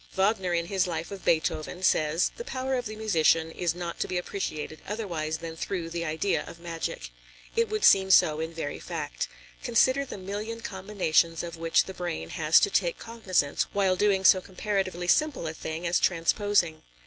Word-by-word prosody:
Wagner 190 -1 +1
in 170 -1 0
his 190 +1 0
life 165 0 -4
of 195 -1 -8
Beethoven 165 +2 0
says: 155 -1 +2
"The 475 - -6
power 265 - -3
of 245 -2 -1
the 215 - -7
musician 165 -6 +2
is 170 0 -1
not 175 -1 -5
to - - -1
be 180 - -2
appreciated 155 -4 -4
otherwise 170 -7 -3
than 165 -1 -7
through 165 0 -4
the 170 0 -3
idea 160 +5 0
of 170 - -10
magic." 165 - -5 0.4
It 460 0 +2
would 430 0 0
seem 190 -1 +6
so 155 -4 +5
in 160 +1 -3
very 160 -3 -5
fact. - - -4 0.3
Consider 260 +4 +3
the 275 - -8
million 205 +4 -5
combinations 190 -5 0
of 170 -1 -6
which 165 0 +2
the 190 - -8
brain 80 - -4
has 155 - +4
to 405 - +2
take - - +1
cognizance 190 -11 -1
while 195 -2 +2
doing 195 -1 +2
so 185 - +7
comparatively 190 -2 -2
simple 300 - +2
a 160 - -3
thing 160 +2 -5
as 170 0 +2
transposing. 175 -1 +1
180 Hz, 185 wpm, -27 LUFS, 165-205 Hz, 0.4 s, so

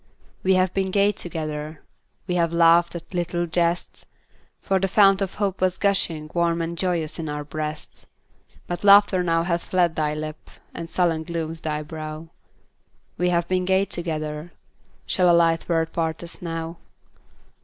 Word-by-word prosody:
We 190 0 +3
have 185 -1 +2
been 190 -1 0
gay 200 +2 +3
together; 155 -5 -6 0.4
We 180 - -2
have 170 -2 +1
laughed 170 +1 +4
at 170 +2 -9
little 175 0 -1
jests; 170 +1 -1 0.6
For 190 -1 0
the 195 - +1
fount 195 0 +5
of 195 -2 -2
hope 195 -3 -2
was 185 0 +1
gushing 170 -7 0
Warm 170 -1 +1
and 165 +1 -3
joyous 170 -3 -1
in 160 -2 -4
our 150 0 -4
breasts, 150 +1 -6 0.6
But 175 +2 -5
laughter 200 -2 +6
now 165 -1 +1
hath 170 -1 -1
fled 175 -3 +1
thy 150 -1 0
lip, 155 0 -7 0.2
And 165 0 -7
sullen 170 -3 +1
glooms 165 -1 -4
thy 150 -1 -2
brow; 155 +1 -7 0.9
We 180 0 +2
have 170 -1 +1
been 185 0 0
gay 190 +1 +2
together, 155 -2 -4 0.5
Shall 180 -1 +2
a 170 - +6
light 165 0 +2
word 165 -1 0
part 160 0 -2
us 170 - -11
now? 165 -1 -5
170 Hz, 165 wpm, -23 LUFS, 160-180 Hz, 0.9 s, laughter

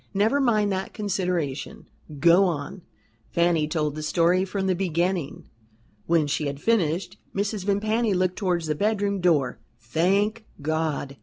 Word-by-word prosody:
Never 220 +8 +3
mind 215 -6 +2
that 190 0 -3
consideration 180 -9 -2 0.3
go 170 +5 +6
on." 165 +1 -3 0.5
Fanny 170 -3 +2
told 155 -2 -1
the 155 - -6
story 170 +4 +2
from 195 0 -3
the 190 - +2
beginning. 175 -3 -2 0.6
When 165 -2 +3
she 145 +1 -1
had 140 0 -4
finished, 180 -4 0 0.2
Mrs. 200 -1 -2
Vimpany 215 +1 +1
looked 185 0 +1
towards 180 -4 0
the 155 - 0
bedroom 200 +2 0
door. 155 -7 +2 0.2
"Thank 195 - 0
God!" 150 -2 -2
180 Hz, 140 wpm, -25 LUFS, 155-200 Hz, 0.6 s, go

